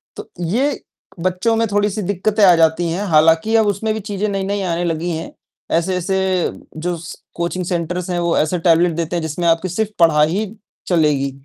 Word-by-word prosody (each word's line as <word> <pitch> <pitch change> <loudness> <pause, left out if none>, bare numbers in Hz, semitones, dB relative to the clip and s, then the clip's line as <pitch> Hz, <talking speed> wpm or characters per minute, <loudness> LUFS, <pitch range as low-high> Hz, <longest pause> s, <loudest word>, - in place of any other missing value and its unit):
तो - - -9
ये 245 - 0 0.4
बच्चों 185 +6 0
में 225 0 +1
थोड़ी-सी 205 +1 0
दिक्कतें 205 +3 0
आ 180 -2 +7
जाती 165 +1 +2
हैं। 185 +5 -2
हालाँकि 165 +8 +4
अब 220 -1 +4
उसमें 205 +2 0
भी 220 - -3
चीज़ें 205 0 -3
नई-नई 200 0 -2
आने 175 -2 -1
लगी 165 +1 -2
हैं। 165 - -7 0.5
ऐसे-ऐसे 180 +2 -1 0.6
जो 175 +2 -2
स 165 0 -10
कोचिंग 175 +1 -2
सेंटर्स 175 +1 -3
हैं 175 - -1
वो 170 -1 +1
ऐसे 155 +4 +1
टेबलेट 170 +1 +3
देते 170 +1 -2
हैं 170 - -1
जिसमें 160 +2 -2
आपकी 165 +2 +2
सिर्फ़ 210 +4 -1
पढ़ाई 155 -3 +5
ही 210 +3 0 0.4
चलेगी। 150 -6 +2
175 Hz, 185 wpm, -19 LUFS, 165-200 Hz, 0.6 s, आ